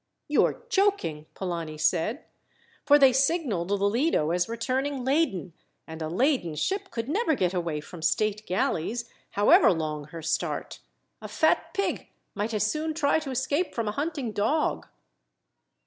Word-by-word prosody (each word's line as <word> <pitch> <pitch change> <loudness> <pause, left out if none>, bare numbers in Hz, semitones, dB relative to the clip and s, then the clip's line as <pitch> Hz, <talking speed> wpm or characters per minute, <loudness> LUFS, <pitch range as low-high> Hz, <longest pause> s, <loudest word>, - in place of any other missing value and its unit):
"You - - +4
are - - -3
joking," 390 - 0
Polani 170 -4 -4
said, 180 - 0 0.6
"for 290 0 +8
they 270 -3 +6
signalled 270 - +1
the 205 - +2
Lido 200 - +1
as 175 +3 0
returning 255 +3 -2
laden, 260 - 0 0.3
and 160 0 -9
a 155 - -2
laden 210 - +1
ship 390 - -2
could 230 0 -4
never 320 - +1
get 185 -6 0
away 170 -4 -2
from 165 +2 -11
state 215 +5 0
galleys, 200 +5 -1 0.3
however 205 +1 +6
long 155 -3 -3
her 160 +2 -9
start. 165 +1 -2 0.4
A - - -6
fat - - +1
pig 395 - -2 0.2
might 210 +3 -2
as 210 - +1
soon 310 +7 -2
try 300 -1 +2
to 305 -3 -7
escape 280 +6 -1
from 230 -2 -1
a - - 0
hunting 285 -1 -3
dog." 220 +10 0
225 Hz, 155 wpm, -27 LUFS, 175-290 Hz, 0.6 s, for